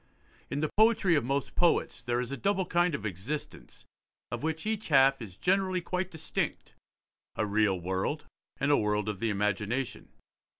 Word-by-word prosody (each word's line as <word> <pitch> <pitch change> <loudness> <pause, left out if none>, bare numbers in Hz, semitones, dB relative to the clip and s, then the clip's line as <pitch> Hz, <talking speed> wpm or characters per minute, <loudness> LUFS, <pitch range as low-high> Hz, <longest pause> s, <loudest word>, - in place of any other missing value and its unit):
In 140 - -2
the 155 - -1
poetry 220 -4 +5
of 150 - +3
most 135 +2 -1
poets 175 -1 +2
there 120 0 -1
is 125 +1 -3
a - - -1
double 195 +3 0
kind 175 -2 +2
of 110 - -6
existence, 105 - -6 0.5
of - - -3
which 160 +2 -2
each 220 0 -2
half 135 -2 +5
is 100 -5 -9
generally 185 0 +1
quite 180 +1 -2
distinct; 160 -4 -3 0.6
a 110 - 0
real 105 -2 +2
world, 95 - -2 0.3
and 140 +1 +2
a 145 - +6
world 105 -1 0
of 105 -3 -3
the 115 - 0
imagination. 105 +5 -1
140 Hz, 170 wpm, -30 LUFS, 105-175 Hz, 0.6 s, a